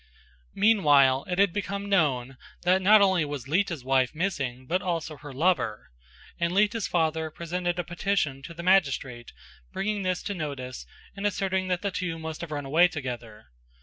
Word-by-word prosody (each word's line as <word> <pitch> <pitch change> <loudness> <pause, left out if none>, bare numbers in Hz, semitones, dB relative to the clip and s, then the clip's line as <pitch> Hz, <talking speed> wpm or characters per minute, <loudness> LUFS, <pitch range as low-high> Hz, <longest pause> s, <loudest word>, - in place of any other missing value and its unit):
Meanwhile 145 -11 +4
it 180 - -2
had 200 -3 +3
become 200 0 -3
known 135 -9 +1 0.3
that 185 +2 +3
not 205 +2 +7
only 190 -4 +3
was 145 -4 -5
Lita's 170 -2 0
wife 130 +1 +1
missing 135 -8 -2
but 180 +7 0
also 165 -3 -3
her 145 +2 -10
lover; 135 - 0 0.5
and 170 0 +1
Lita's 210 +1 +2
father 160 -2 0
presented 175 +2 -3
a 175 - -1
petition 175 -5 -1
to 170 +4 -10
the 170 - -7
magistrate 140 -10 +1 0.4
bringing 210 +1 -2
this 185 -2 -1
to 205 - -3
notice 140 -7 -6 0.3
and 200 +1 -1
asserting 190 -2 -1
that 180 0 -1
the 200 - -1
two 180 -3 -3
must 160 0 -6
have 170 - -6
run 145 -2 -4
away 165 +6 +5
together. 120 -8 -7
170 Hz, 170 wpm, -27 LUFS, 140-190 Hz, 0.5 s, not